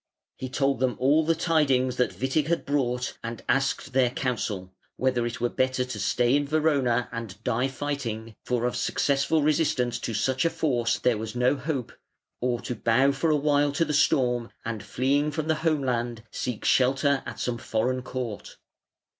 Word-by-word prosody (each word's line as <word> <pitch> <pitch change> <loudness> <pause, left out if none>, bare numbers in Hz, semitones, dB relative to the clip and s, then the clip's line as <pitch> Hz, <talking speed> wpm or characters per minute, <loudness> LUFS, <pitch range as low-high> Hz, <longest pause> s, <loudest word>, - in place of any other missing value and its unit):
He 130 - -6
told 135 +1 +1
them 125 -3 +1
all 145 +5 +3
the 165 +1 +2
tidings 140 -7 +2
that 125 - +2
Witig 135 +3 +1
had 170 0 0
brought 125 -3 -1
and 115 -1 -6
asked 135 0 0
their 130 -2 +4
counsel, 110 -8 -3 0.2
whether 125 -2 +1
it 120 - -5
were 120 - +1
better 130 +1 0
to 125 -4 -6
stay 120 +6 +2
in 145 0 +1
Verona 140 -6 +2
and 115 -4 -6
die 125 +4 +1
fighting 130 -6 -4
for 120 -1 -1
of 125 - -1
successful 140 +2 +1
resistance 145 -5 +1
to 115 - -4
such 130 +4 +1
a 165 - +3
force 140 -8 0
there 120 -4 +1
was 110 +1 -5
no 125 +3 +3
hope 135 -3 -3 0.5
or 120 -1 0
to - - -4
bow 125 +4 +3
for 140 +4 0
a 155 - +4
while 145 0 +2
to 165 - +1
the 150 - -2
storm 125 -5 +2 0.2
and 115 -2 -3
fleeing 140 +4 +1
from 155 +1 -3
the 160 - +3
home 155 -4 +1
land 120 -3 -2
seek 125 -4 -4
shelter 135 +2 +3
at - - -7
some 120 -1 -2
foreign 125 +4 -1
court. 125 -5 -6
130 Hz, 180 wpm, -26 LUFS, 120-145 Hz, 0.5 s, their